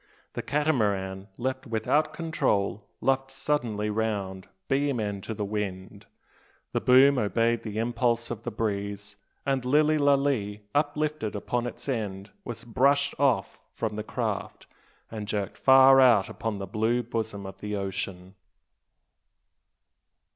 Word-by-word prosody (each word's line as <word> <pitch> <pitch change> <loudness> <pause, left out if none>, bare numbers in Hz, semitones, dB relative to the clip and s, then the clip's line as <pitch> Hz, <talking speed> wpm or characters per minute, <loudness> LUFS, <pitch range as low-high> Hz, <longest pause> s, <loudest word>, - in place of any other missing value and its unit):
The - - -3
Catamaran, 100 -10 0
left 130 +2 -3
without 135 +7 +1
control, 105 -12 -1
luffed 135 0 +1
suddenly 120 -7 -1
round 100 -4 -2 0.2
beam 140 -2 +1
end 100 -2 -3
to 110 - -4
the 105 - -2
wind; 100 -3 -5 0.6
the - - -1
boom 130 +2 +6
obeyed 115 +2 +1
the 110 -1 -6
impulse 115 0 0
of 115 -2 -5
the 120 - -4
breeze; 100 -2 -3 0.3
and 135 -2 0
Lilly 150 +4 +3
Lalee, 135 -8 +1
uplifted 150 -5 -1
upon 120 +4 -2
its 120 - -9
end, 105 -6 -3
was 115 -1 -7
brushed 140 +4 +2
off 140 -4 +1 0.2
from 110 -2 -2
the 105 - -3
craft, - - -4 0.5
and 105 -2 -5
jerked 100 -1 -3
far 135 0 +7
out 115 -7 +5
upon 110 -2 -4
the 100 - -4
blue 110 +5 0
bosom 110 -3 -4
of 95 - -9
the 105 0 -4
ocean! 95 -1 -4
115 Hz, 135 wpm, -27 LUFS, 105-135 Hz, 0.6 s, far